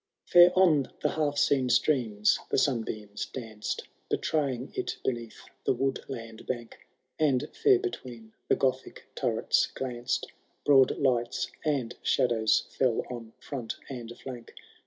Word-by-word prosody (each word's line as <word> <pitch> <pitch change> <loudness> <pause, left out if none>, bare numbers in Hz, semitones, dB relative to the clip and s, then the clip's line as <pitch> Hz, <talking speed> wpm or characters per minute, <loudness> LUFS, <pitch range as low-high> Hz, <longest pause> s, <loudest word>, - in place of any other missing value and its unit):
II. - - -30 0.2
Fair - - +1
on 155 -8 +4
the - - +3
half 150 -2 -1
seen 135 -3 +3
streams 115 -8 +2
the - - +1
sunbeams 110 -6 -1
danced. 110 -4 -5 0.3
Betraying 135 -5 -1
it - - -3
beneath 120 -3 -3 0.2
the - - +2
woodland 115 -4 -4
bank. 120 -2 -6 0.3
And 150 -2 +2
fair 405 -3 +5
between 120 - -6
the - - +4
Gothic 130 -1 -1
turrets - - +1
glanced 125 -1 -3 0.3
Broad 135 -3 +5
lights, 120 -4 0
and 135 -6 -1
shadows 120 -4 +2 0.2
fell 125 -4 +2
on 115 -2 -7
front 125 -6 -5 0.2
and 120 -3 -6
flank. 125 -3 -9
125 Hz, 130 wpm, -29 LUFS, 115-140 Hz, 0.3 s, fair